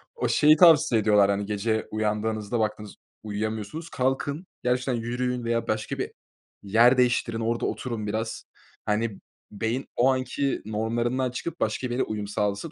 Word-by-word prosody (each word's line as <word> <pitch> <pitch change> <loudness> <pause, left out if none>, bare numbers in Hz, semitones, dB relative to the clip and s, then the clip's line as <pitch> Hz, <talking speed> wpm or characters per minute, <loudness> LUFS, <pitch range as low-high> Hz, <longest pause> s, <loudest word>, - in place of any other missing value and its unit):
O 470 - -1
şeyi 150 +1 +5
tavsiye 155 -9 +6
ediyorlar 105 -2 +4
hani 100 0 -1
gece 110 +2 -1
uyandığınızda 110 +1 -1
baktınız 105 -1 -3 0.3
uyuyamıyorsunuz. 110 +9 -4
Kalkın 140 +6 -1 0.2
gerçekten 125 +1 +1
yürüyün 120 +1 -2
veya 115 0 0
başka 110 0 -2
bir - - -3 0.5
yer 115 +6 +5
değiştirin 120 -2 +2
orada 115 +1 -1
oturun 115 -4 -3
biraz. 110 +2 -3 0.4
Hani 105 -1 -1 0.3
beyin 115 +5 -2
o 125 +2 +4
anki 130 +1 -1
normlarından 120 +4 -1
çıkıp 170 +7 -5
başka 130 - -1
bir 120 - -4
yere 125 - +1
uyum 105 -1 -4
sağlasın 105 +7 -2
115 Hz, 145 wpm, -26 LUFS, 105-125 Hz, 0.5 s, tavsiye